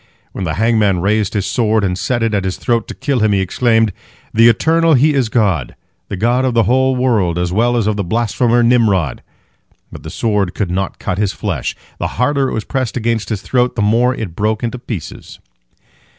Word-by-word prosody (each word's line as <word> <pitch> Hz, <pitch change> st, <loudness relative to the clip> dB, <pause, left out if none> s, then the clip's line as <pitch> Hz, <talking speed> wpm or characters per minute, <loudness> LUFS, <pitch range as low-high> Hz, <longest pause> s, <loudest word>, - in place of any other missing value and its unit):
When 95 Hz, -, -5 dB
the 80 Hz, -, -2 dB
hangman 105 Hz, -3 st, +2 dB
raised 105 Hz, +3 st, 0 dB
his 100 Hz, -2 st, 0 dB
sword 110 Hz, +2 st, +1 dB
and 90 Hz, -2 st, 0 dB
set 120 Hz, +5 st, -1 dB
it 115 Hz, -1 st, 0 dB
at 100 Hz, -2 st, 0 dB
his 95 Hz, -1 st, -3 dB
throat 115 Hz, -2 st, -1 dB
to -, -, -7 dB
kill 140 Hz, -3 st, -1 dB
him, 105 Hz, -1 st, +2 dB
he 100 Hz, -, +2 dB
exclaimed, 115 Hz, +2 st, +1 dB, 0.4 s
"The 115 Hz, +1 st, +6 dB
Eternal 160 Hz, +7 st, +3 dB
He 150 Hz, +4 st, +3 dB
is 130 Hz, -5 st, +1 dB
God, 95 Hz, -, 0 dB, 0.3 s
the 100 Hz, -, -4 dB
God 120 Hz, +6 st, +1 dB
of 130 Hz, -2 st, 0 dB
the 115 Hz, -, +4 dB
whole 130 Hz, +2 st, +2 dB
world 110 Hz, -10 st, +1 dB
as 90 Hz, 0 st, -1 dB
well 120 Hz, +4 st, +2 dB
as 115 Hz, -, 0 dB
of 105 Hz, -1 st, 0 dB
the 100 Hz, -, -1 dB
blasphemer 120 Hz, +4 st, +1 dB
Nimrod." 110 Hz, -, +2 dB, 0.7 s
But -, -, -10 dB
the -, -, -8 dB
sword 105 Hz, -5 st, -1 dB
could 95 Hz, -5 st, -2 dB
not 95 Hz, +1 st, -2 dB
cut 90 Hz, -, -3 dB
his 105 Hz, -2 st, 0 dB
flesh. -, -, -3 dB, 0.2 s
The -, -, -1 dB
harder 135 Hz, +1 st, +1 dB
it -, -, -5 dB
was 110 Hz, -, -2 dB
pressed 130 Hz, -3 st, -3 dB
against 115 Hz, -2 st, -1 dB
his 105 Hz, -4 st, -3 dB
throat, 125 Hz, -1 st, 0 dB
the 110 Hz, -, 0 dB
more 120 Hz, +4 st, +2 dB
it 95 Hz, -9 st, -6 dB
broke 110 Hz, +3 st, -1 dB
into 120 Hz, +1 st, -3 dB
pieces. 105 Hz, -9 st, -8 dB
110 Hz, 210 wpm, -16 LUFS, 100-120 Hz, 0.7 s, The